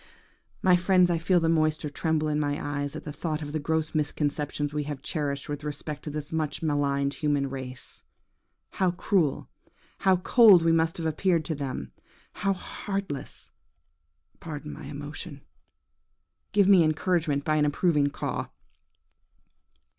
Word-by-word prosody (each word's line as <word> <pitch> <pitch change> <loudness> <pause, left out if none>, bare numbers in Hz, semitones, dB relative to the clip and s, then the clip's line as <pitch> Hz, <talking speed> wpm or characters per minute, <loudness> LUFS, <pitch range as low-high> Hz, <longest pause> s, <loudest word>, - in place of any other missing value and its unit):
"My 185 -1 +6
friends, 180 0 +4
I 170 - +1
feel 175 +2 +3
the 165 - +1
moisture 155 -2 +1
tremble 155 0 0
in 150 0 0
my 145 -1 0
eyes 145 -1 -3
at - - -6
the 150 - -6
thought 155 0 -3
of 145 - -6
the 155 - -2
gross 160 +1 -1
misconceptions 145 -1 -1
we 150 -1 -2
have 145 -2 -6
cherished 145 -3 -2
with 145 -1 -5
respect 150 0 -5
to - - -3
this 150 +2 -5
much 155 -1 -2
maligned 140 -2 +1
human 145 -1 0
race. 130 -1 -8 0.7
How 190 -2 +1
cruel, 175 -4 0 0.5
how 190 -1 +4
cold 200 -2 +7
we 165 - +4
must 165 0 +2
have 165 - -4
appeared 160 +1 +1
to 160 - -1
them! 135 - -5 0.4
How 195 +2 0
heartless–pardon 165 - -8
my - - -9
emotion!... 145 +1 -7 1.1
Give 200 -2 +4
me 195 -3 +7
encouragement 155 -2 0
by 155 -1 +2
an 150 - +3
approving 145 -1 +2
caw.". - - -3
155 Hz, 145 wpm, -27 LUFS, 145-170 Hz, 1.1 s, cold